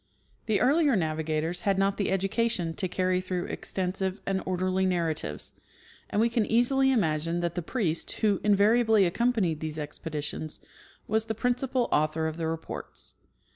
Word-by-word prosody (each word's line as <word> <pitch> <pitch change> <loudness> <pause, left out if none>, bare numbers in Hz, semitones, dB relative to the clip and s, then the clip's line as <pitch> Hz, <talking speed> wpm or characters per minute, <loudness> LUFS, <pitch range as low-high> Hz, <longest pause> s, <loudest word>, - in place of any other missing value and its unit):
The 215 -2 +2
earlier 285 +1 +4
navigators 160 0 -1
had 195 -1 +1
not 195 0 +1
the 200 - 0
education 195 -2 0
to 185 - -2
carry 185 0 0
through 185 -1 -3
extensive 190 +1 -2
and 195 -1 0
orderly 185 +1 0
narratives, 165 - -1 0.6
and 205 - 0
we 230 - +4
can 230 -1 +1
easily 265 +3 +3
imagine 165 -6 +1
that 170 -1 -1
the 175 - -2
priest, 170 -4 -2
who 205 -3 +1
invariably 215 +1 +4
accompanied 195 -4 +1
these 155 0 -4
expeditions, 150 0 -5 0.5
was 220 +1 +1
the 220 0 -3
principal 250 +2 0
aiuthor 155 +1 +1
of 160 0 -4
the 165 -1 -2
reports. 160 0 -6
185 Hz, 150 wpm, -28 LUFS, 165-220 Hz, 0.6 s, earlier